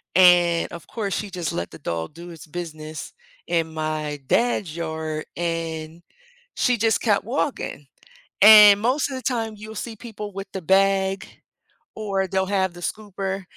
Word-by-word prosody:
and 175 -2 +5
of 170 -2 -9
course 205 -5 -3
she 210 - -3
just 175 -5 -3
let 85 - -3
the - - -11
dog 85 - -4
do 170 +2 -10
its 160 -1 -12
business 155 -2 -7 0.3
in 165 -2 0
my 155 -1 -3
dad's 205 - +1
yard, 160 -2 -4
and 165 -1 -4 0.5
she 250 -2 +2
just 225 +1 +2
kept 210 -4 +2
walking, 245 - -3 0.6
and 210 -1 +10
most 260 +6 +1
of 265 - -4
the 260 - -6
time 225 -4 -1
you'll 215 +1 -9
see 225 +2 -5
people 210 -2 -8
with 195 +1 -6
the 190 - -5
bag 195 +1 +2 0.7
or 195 -3 -1
they'll 190 +1 0
have 190 -2 0
the 175 - -11
scooper, 195 -1 -4
190 Hz, 160 wpm, -23 LUFS, 165-210 Hz, 0.7 s, and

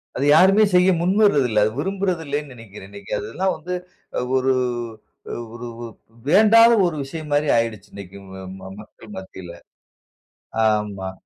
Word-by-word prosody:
அது 135 - -1
யாருமே 195 +5 +5
செய்ய 180 +1 +5
முன்வர்றது 185 -6 +3
இல்ல, 105 -1 +2
அத 110 - +1
விரும்புறது 190 0 -2
இல்லன்னு 145 -1 -4
நினைக்கிறேன். 105 -4 -12
இன்னைக்கு 100 -1 -12
அதெல்லாம் 190 0 -2
வந்து 180 +4 -6 0.6
ஒரு 130 0 +2 1.0
ஒரு 120 +1 -8 0.2
ஒரு - - -6 0.4
வேண்டாத 220 +5 +6
ஒரு 170 -3 -1
விஷயம் 155 +2 -8
மாரி 145 +1 +1
ஆயிடுச்சு 110 -3 -3
இன்னைக்கு 100 -1 -10 0.6
மக்கள் 105 0 -13
மத்தியில. 95 -2 -11 1.1
ஆமா. 105 -3 -2
140 Hz, 130 wpm, -21 LUFS, -, 1.1 s, வேண்டாத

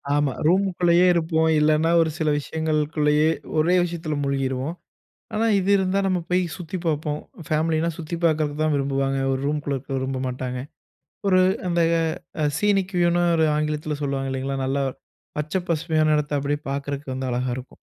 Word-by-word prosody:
ஆமா. 145 -2 +1
ரூமுக்குள்ளயே 180 -1 +3
இருப்போம். 160 -1 +1
இல்லைன்னா, 155 +1 +3
ஒரு 160 - +2
சில 155 -1 +1
விஷயங்களுக்குள்ளயே, 155 0 +1 0.3
ஒரே 170 +4 +3
விஷயத்தில 165 -3 -3
மூழ்கிருவோம். 135 +2 -1 0.6
ஆனா, 220 +1 +1
இது 190 +1 -1
இருந்தா, 190 0 +1
நம்ம 185 -1 +1
போய் 180 +1 +2
சுத்திப் 180 0 -6
பார்ப்போம். 150 -1 -1 0.3
ஃபேமிலினா 160 +1 +1
சுத்தி 165 0 -5
பார்க்கறதுக்கு 155 -2 +1
தான் 155 -1 +2
விரும்புவாங்க. 135 -1 0
ஒரு 130 0 -1
ரூம்க்குள்ள 145 -1 -1
இருக்க 130 - -11
விரும்ப 130 0 -2
மாட்டாங்க. 125 0 -4 0.7
ஒரு 185 -1 +5 0.3
அந்த 170 -1 +1 0.8
சீனிக் 195 -2 +1
வியூனு 175 0 +3
ஒரு 160 -1 +3
ஆங்கிலத்தில 150 0 -2
சொல்லுவாங்க. 135 -1 -2
இல்லைங்களா, 135 +1 -2
நல்லா 140 +1 0 0.5
பச்சை, 155 +5 -1
பசுமையான 155 -1 +2
இடத்தை 150 0 -1
அப்படியே 145 +1 -1
பார்க்குறக்கு 140 0 -4
வந்து 130 0 -3
அழகா 125 +1 -1
இருக்கும். 130 - -11
155 Hz, 145 wpm, -23 LUFS, 140-170 Hz, 0.8 s, ஒரு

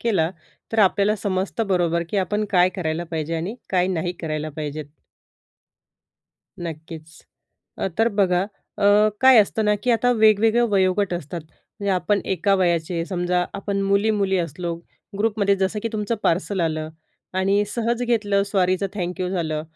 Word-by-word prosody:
केला 185 -8 +1 0.4
तर 225 - -1
आपल्याला 205 +1 +3
समजतं 195 +3 -2
बरोबर 170 -3 +1
की 205 - -2
आपण 210 +3 0
काय 180 -2 +5
करायला 165 -1 -2
पाहिजे? 160 -1 -3
आणि 180 +8 -4 0.2
काय 180 -1 +2
नाही 175 -1 -1
करायला 155 -1 -3
पाहिजेत? 150 0 -4 1.7
नक्कीच. 160 -1 -8 0.6
अ, - - -1
तर 225 +1 +4
बघा 180 0 +2 0.3
अ, - - -3 0.4
काय 260 -2 +7
असतं 215 +1 +2
ना 210 0 +3
की 250 - +1
आता 240 +2 +3
वेगवेगळं 220 +2 +4
वयोगट 190 0 +2
असतात. 170 +1 -5
म्हणजे 200 +6 -7
आपण 185 +3 +1
एका 195 +2 +1
वयाचे 170 -2 0
समजा 180 -1 0
आपण 200 0 -2
मुली-मुली 200 -1 +2
असलो 170 +1 -3 0.4
ग्रुपमध्ये 205 -2 +2
जसं 190 +2 -1
की 230 - -1
तुमचं 215 +1 -1
पार्सल 185 +2 0
आलं 155 -1 -1 0.5
आणि 200 +2 +2
सहज 235 +1 -1
घेतलं. 210 -4 +1
सॉरीचं 190 -1 +1
थँक्यू 180 -1 -3
झालं. 160 -4 -2
190 Hz, 145 wpm, -22 LUFS, 170-210 Hz, 1.7 s, काय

